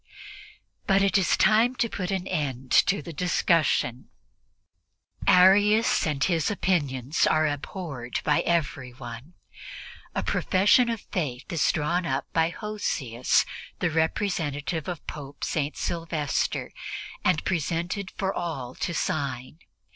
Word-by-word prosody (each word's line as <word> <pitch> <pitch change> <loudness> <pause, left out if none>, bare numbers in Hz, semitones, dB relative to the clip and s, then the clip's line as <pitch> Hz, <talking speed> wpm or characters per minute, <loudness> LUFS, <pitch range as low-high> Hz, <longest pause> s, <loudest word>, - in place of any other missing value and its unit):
But 195 -1 +4
it 195 - +2
is 195 -3 +3
time 220 +5 +4
to 235 - +1
put 185 -4 -4
an 190 -2 -2
end 130 -4 -3 0.2
to 200 +2 +1
the 170 - -8
discussion; 155 -6 +1 1.2
Arius 205 +5 +5
and 140 -3 0
his 165 -4 +1
opinions 145 - 0
are 155 0 +3
abhorred 145 -4 -4
by 150 -1 +3
everyone. 130 -3 -3 0.8
A - - 0
profession 210 +6 +3
of 230 -2 -2
Faith 145 -2 -4
is 165 - +3
drawn 170 +4 -1
up 135 -2 -1
by 165 0 +3
Hosius, 170 - 0 0.3
the - - 0
representative 160 -2 -1
of 175 -3 -5
Pope 145 -1 -8
St. 150 -1 -2
Sylvester, 165 -4 -2 0.5
and 180 -4 +2
presented 175 +3 -2
for 195 -2 -1
all 140 -8 -4
to 170 - -3
sign. 140 -1 -3
165 Hz, 120 wpm, -26 LUFS, 140-190 Hz, 1.2 s, Arius